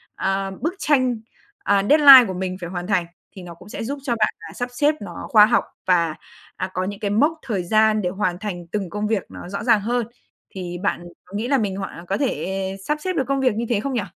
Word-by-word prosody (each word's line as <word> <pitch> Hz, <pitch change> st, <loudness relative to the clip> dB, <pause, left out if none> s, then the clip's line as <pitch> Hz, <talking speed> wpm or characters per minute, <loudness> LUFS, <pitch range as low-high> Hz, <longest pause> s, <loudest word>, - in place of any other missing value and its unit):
ờ, 195 Hz, 0 st, -1 dB
bức 330 Hz, +4 st, -1 dB
tranh, 255 Hz, -4 st, +2 dB, 0.4 s
à, 200 Hz, -1 st, +1 dB
deadline 280 Hz, -4 st, +9 dB
của 190 Hz, -, -4 dB
mình 185 Hz, 0 st, -4 dB
phải 175 Hz, -, -5 dB
hoàn 175 Hz, 0 st, -5 dB
thành, 185 Hz, -4 st, +1 dB, 0.3 s
thì 190 Hz, -, -9 dB
nó 175 Hz, -, -9 dB
cũng 185 Hz, -, -15 dB
sẽ -, -, -5 dB
giúp 275 Hz, +5 st, -4 dB
cho 260 Hz, -4 st, 0 dB
bạn, 220 Hz, -2 st, +1 dB
à, -, -, -10 dB
sắp 245 Hz, 0 st, -4 dB
xếp 295 Hz, +4 st, +2 dB
nó 180 Hz, -4 st, -8 dB
khoa 210 Hz, -2 st, +7 dB
học 230 Hz, -, +2 dB, 0.2 s
và, 170 Hz, -3 st, +2 dB, 0.4 s
à, 185 Hz, -, -3 dB
có 185 Hz, -, -1 dB
những 200 Hz, 0 st, -5 dB
cái 205 Hz, -1 st, -2 dB
mốc 300 Hz, +9 st, +2 dB
thời 200 Hz, -7 st, -1 dB
gian 215 Hz, +3 st, +3 dB
để 180 Hz, -, -1 dB
hoàn 180 Hz, -2 st, -2 dB
thành 180 Hz, -5 st, -6 dB
từng 200 Hz, -4 st, -2 dB
công 210 Hz, +3 st, -3 dB
việc 210 Hz, -3 st, 0 dB
nó 175 Hz, -, -10 dB
rõ 200 Hz, -, -4 dB
ràng 230 Hz, -4 st, +4 dB
hơn. 240 Hz, +1 st, -1 dB, 0.4 s
Thì 180 Hz, -2 st, -6 dB
bạn 200 Hz, -, -1 dB, 0.2 s
có 185 Hz, -, -19 dB
nghĩ 225 Hz, -, -2 dB
là 275 Hz, +1 st, +3 dB
mình 200 Hz, -5 st, -2 dB
hoàn 185 Hz, -3 st, -7 dB
có 195 Hz, -, -1 dB
thể 195 Hz, -8 st, -2 dB
sắp 300 Hz, -, +1 dB
xếp 370 Hz, +2 st, -2 dB
được 275 Hz, -, 0 dB
công 275 Hz, 0 st, 0 dB
việc 255 Hz, -5 st, +2 dB
như 235 Hz, -, -2 dB
thế 230 Hz, -4 st, +1 dB
không 275 Hz, +3 st, -3 dB
nhỉ? 240 Hz, -, 0 dB
210 Hz, 250 wpm, -22 LUFS, 185-245 Hz, 0.4 s, deadline